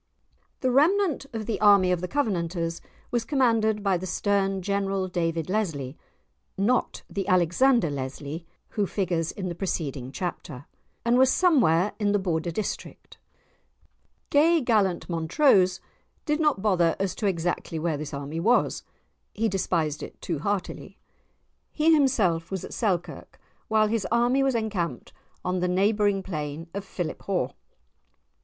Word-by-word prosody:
The 255 - +1
remnant 315 +2 +2
of 225 -2 -4
the 225 - -3
army 200 -3 +6
of 180 -1 0
the 180 - -3
Covenanters 170 - -1 0.3
was 240 -2 0
commanded 225 -6 +1
by 195 -2 +2
the 185 +2 -6
stern 195 0 0
General 195 -1 -1
David 165 -3 -1
Lesly 160 -10 -2 0.6
(not 230 +6 0
the 195 -2 -4
Alexander 185 - +3
Leslie 140 +4 -5 0.2
who 205 -3 -1
figures 175 -5 -1
in 190 -2 -5
the 175 - -3
preceding 145 -8 -3
chapter), 155 -4 -5 0.4
and 240 +1 +4
was 260 0 +5
somewhere 210 - +3
in 205 -1 +1
the - - +4
Border 175 -3 -1
district. 200 +5 -6 1.1
Gay 325 +4 +5
Gallant 210 - +1
Montrose 185 - +3 0.5
did 300 0 0
not 300 -11 +1
bother 175 -6 +3
as 195 -2 -1
to 210 - -2
exactly 170 -2 -2
where 160 0 -1
this 150 0 -6
army 140 +3 -5
was; 235 +8 +2 0.5
he 225 +2 +1
despised 170 -6 -1
it - - -9
too 165 -5 -3
heartily. 200 +3 -3 0.7
He 320 +1 +3
himself 210 - +2
was 190 -2 -4
at - - -9
Selkirk, 185 -7 -3 0.3
while 215 -1 +3
his 215 -3 -1
army 240 +3 +3
was 270 -2 +1
encamped 210 -7 -3 0.3
on 180 0 0
the 180 - 0
neighbouring 200 +1 +2
plain 155 -2 -5
of 200 0 -4
Philiphaugh. 180 -4 -3
195 Hz, 140 wpm, -26 LUFS, 170-225 Hz, 1.1 s, army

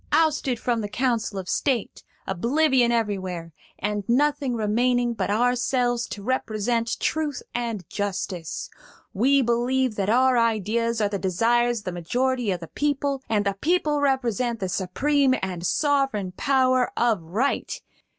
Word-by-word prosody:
ousted 300 -6 +2
from 235 -1 0
the 205 - -4
council 230 -3 -1
of 185 -1 -5
state, 250 -2 -1 0.2
oblivion 250 - +2
everywhere, 190 -7 -2 0.2
and 205 0 -2
nothing 275 0 +2
remaining 240 +3 +1
but 225 - -2
ourselves 245 +2 +1
to 200 - -7
represent 230 -1 -1
Truth 305 -4 -1
and 230 -7 -3
Justice. 190 -4 -4 0.4
We 270 +6 +3
believe 245 0 +1
that 195 0 0
our 255 +2 +4
ideas 230 +1 0
are 205 - +2
the 200 -1 -3
desires 235 +5 +1
of - - -25
the 185 - -2
majority 245 +7 -1
of 180 -2 -1
the 165 - -7
people, 285 - -1
and 210 -2 +1
the 200 - +1
people 305 -3 +1
represent 245 -4 0
the 190 -3 -2
supreme 265 +10 +1
and 180 -3 -3
sovereign 270 - +1
power 255 -2 +2
of 230 -6 +2
Right! 210 +13 -1
235 Hz, 140 wpm, -24 LUFS, 205-260 Hz, 0.4 s, our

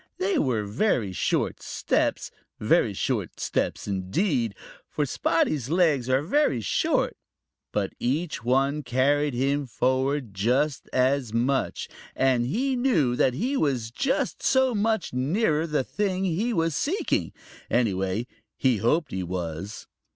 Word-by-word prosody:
They 375 -2 +1
were 120 -6 +1
very 105 - 0
short 90 - -1
steps, - - -1 0.3
very - - +3
short - - -2
steps - - -2
indeed, 110 - 0 0.3
for 150 - -1
Spotty's 145 -2 0
legs 155 -7 +2
are 130 +2 +2
very 180 - +2
short. 105 - 0 0.6
But - - -1
each 150 +3 -1
one 135 +4 +2
carried 140 +2 +1
him 140 +2 0
forward 130 +1 0
just 125 +8 0
so 130 +2 +3 0.2
much, 130 +3 0 0.3
and 130 -2 +2
he 260 - 0
knew 200 - +2
that 125 0 +2
he 255 - -1
was 130 - 0
just 270 - -1
so 260 -1 +3
much 220 - 0
nearer 155 - +1
the 150 -4 0
thing 190 +3 -1
he 190 +7 0
was 165 -6 0
seeking. 360 - 0 0.4
Anyway, 100 -2 0 0.3
he 130 -4 +2
hoped 150 - +1
he 95 - -2
was. 90 +1 -5
135 Hz, 130 wpm, -26 LUFS, 120-175 Hz, 0.6 s, very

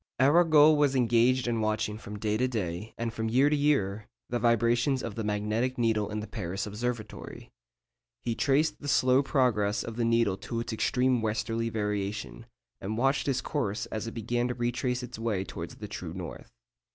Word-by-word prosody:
Arago 155 +2 +6
was 145 -2 +2
engaged 125 +1 +3
in 115 -2 0
watching 110 -1 -1
from 105 -1 -8
day 105 0 -1
to 125 +4 +1
day, 105 -4 -4
and 115 -1 -3
from 110 0 -2
year 135 +5 +4
to - - +4
year, 110 -9 +1 0.2
the 120 - -1
vibrations 120 +3 +2
of 115 - -4
the 110 - -4
magnetic 105 +5 -1
needle 110 -3 +1
in 105 0 -3
the - - -5
Paris 95 -3 -4
Observatory. 115 +1 -5 0.7
He 120 - -1
traced 145 +6 +1
the 145 - -6
slow 130 -1 +4
progress 115 -7 +1
of 115 0 -7
the 120 - +1
needle 115 -4 +2
to 115 +3 -4
its 115 - -5
extreme 125 +2 +1
westerly 115 +1 -1
variation, 105 +1 -3 0.3
and 105 +3 -4
watched 135 +4 +1
its 130 -2 +1
course 115 -9 -2
as 110 +1 -3
it 115 - -7
began 120 +2 -1
to 125 - -3
retrace 125 +1 -1
its 125 -2 -8
way 110 -5 -1
towards - - -7
the - - -8
true - - -6
north. - - -7
115 Hz, 185 wpm, -29 LUFS, 105-125 Hz, 0.7 s, Arago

